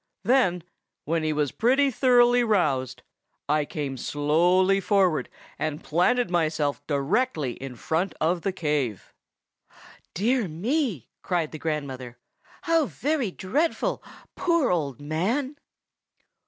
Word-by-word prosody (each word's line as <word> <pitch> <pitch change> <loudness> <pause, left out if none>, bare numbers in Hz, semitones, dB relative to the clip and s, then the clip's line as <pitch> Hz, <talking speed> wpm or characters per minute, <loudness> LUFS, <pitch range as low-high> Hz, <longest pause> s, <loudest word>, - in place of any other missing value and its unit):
Then, 210 -10 +2 0.4
when 165 +2 0
he 155 0 0
was 150 -2 0
pretty 270 +4 +2
thoroughly 245 -1 +4
roused, 150 - 0 0.4
I 150 0 +2
came 140 -3 -4
slowly 175 +8 +2
forward, 190 -4 +1 0.3
and 155 -1 -3
planted 180 +6 +1
myself 155 -4 0
directly 150 - 0
in 130 +1 -8
front 165 +9 -2
of 170 +2 +1
the 195 - -1
cave." 150 - -2 1.0
"Dear 230 +3 +1
me!" 205 - -2
cried 170 -4 -1
the 155 - -7
grandmother. 135 -6 -4 0.5
"How 330 -4 +2
very 285 -6 -1
dreadful! 280 - -1 0.3
poor 335 - +2
old 145 -8 -1
man!" 200 - -1
175 Hz, 115 wpm, -25 LUFS, 150-240 Hz, 1.0 s, thoroughly